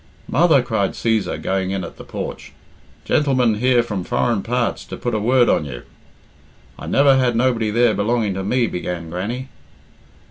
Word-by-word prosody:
"Mother," - - +4
cried - - -1
Cæsar, 110 -5 -1
going 95 -1 -1
in 95 -1 -2
at 85 - -9
the - - -10
porch, - - -7 0.5
"gentleman 130 -7 +2
here 125 0 +3
from 100 -6 -4
foreign 115 +2 0
parts 120 +2 -1
to - - -8
put 120 - -3
a 110 - +1
word 120 +3 +3
on - - +2
you." 65 -5 -8 1.0
"I - - -8
never 135 -1 +4
had 125 -2 +1
nobody 115 -2 +1
there 115 +1 +3
belonging 105 -1 0
to 95 +1 -4
me," 120 +5 +1
began 90 -4 -5
Grannie. 115 +9 -4
115 Hz, 170 wpm, -20 LUFS, 95-125 Hz, 1.0 s, Mother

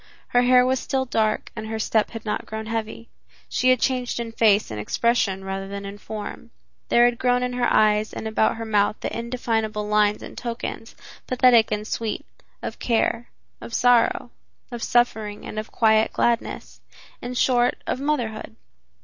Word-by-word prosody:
Her 245 - +4
hair 250 0 +5
was 260 0 +1
still 265 -1 -1
dark 220 -3 0
and 220 -1 -6
her 220 0 -3
step 220 0 +1
had 225 -1 -8
not 210 - -3
grown 220 0 -5
heavy. 225 +1 -4 0.4
She 255 - +1
had 255 -1 +4
changed 250 -2 -1
in 230 -1 -4
face 215 - +3
and 105 - -5
expression 195 - 0
rather 195 0 -4
than 200 0 -6
in 200 +1 -8
form. 215 +2 -7 0.4
There 240 0 +5
had 240 -1 +1
grown 250 0 +2
in 250 0 -2
her 245 -1 +1
eyes 215 0 +3
and 220 - -5
about 220 0 +1
her 225 0 -5
mouth 210 -1 +2
the - - -3
indefinable 225 -3 -2
lines 210 0 +2
and - - -9
tokens, 235 -1 -6 0.3
pathetic 245 -3 +4
and 210 0 -2
sweet, 225 0 -3 0.4
of - - -5
care, 235 0 0 0.3
of 230 - -6
sorrow, 245 0 +3 0.4
of 240 -1 -6
suffering 220 -4 0
and 215 - -5
of 215 - -7
quiet 220 -1 +3
gladness, 235 -1 -1 0.4
in 245 +1 -5
short, 245 0 +3
of - - -2
motherhood. 240 -7 -2
225 Hz, 175 wpm, -23 LUFS, 215-245 Hz, 0.4 s, hair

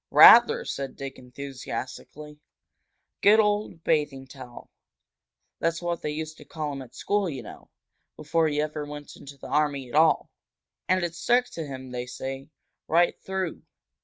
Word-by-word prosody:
"Rather!" 480 +1 +8
said 135 -1 -4
Dick, 135 -1 -7
enthusiastically. 140 +3 -7 0.8
"Good 210 +2 +6
old 210 -5 0
Bathing 145 -3 0
Towel! 130 -3 -12 0.9
That's 165 0 0
what 175 -1 -3
they - - -2
used 155 +1 -5
to - - -12
call 150 -2 -5
him 135 - -6
at 125 -2 -13
school, 205 -2 0
you 135 -5 -6
know, - - -12 0.5
before 165 -1 +1
he 150 -1 -1
ever 150 0 -2
went 145 0 -9
into 140 0 -12
the - - -12
army 145 -2 0
at - - -13
all. 160 +1 +4 0.6
And 185 -1 +2
it 170 -1 -2
stuck 245 +8 +2
to 160 -3 -5
him, 130 -2 -8
they 125 0 -4
say, 135 +2 -6 0.4
right 170 +2 +2
through. 190 -3 -3
150 Hz, 160 wpm, -26 LUFS, 135-170 Hz, 0.9 s, Rather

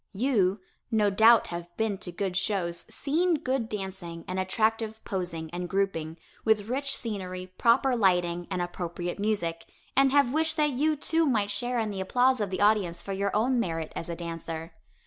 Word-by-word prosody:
You, 205 -4 +2 0.3
no 215 -3 +2
doubt 225 +3 +6
have 170 0 -5
been 220 -3 -1
to 175 - -5
good 185 +1 -3
shows, 185 -3 -1
seen 330 +5 +1
good 260 -5 -1
dancing 190 -5 -6
and 185 +1 -2
attractive 220 +3 0
posing 175 -5 -4
and 175 0 -4
grouping, 170 -5 -1 0.3
with 220 -1 +2
rich 275 +2 -1
scenery, 185 -4 -5
proper 250 +2 +4
lighting 175 -5 +2
and 180 - -1
appropriate 175 +1 -4
music, 185 -6 -1 0.3
and 270 0 +5
have 280 -3 +4
wished 320 +1 +1
that 300 -1 +3
you, 300 +4 +1
too, 320 +2 +3
might 210 -6 +1
share 245 +3 -1
in 220 -2 0
the 195 -1 -4
applause 250 +5 +2
of 205 - -1
the 185 0 -3
audience 205 -5 +2
for 195 - -4
your 200 +1 0
own 245 +4 +2
merit 165 -6 -2
as 165 - -5
a 170 - -3
dancer. 165 -1 -6
200 Hz, 180 wpm, -28 LUFS, 175-235 Hz, 0.3 s, doubt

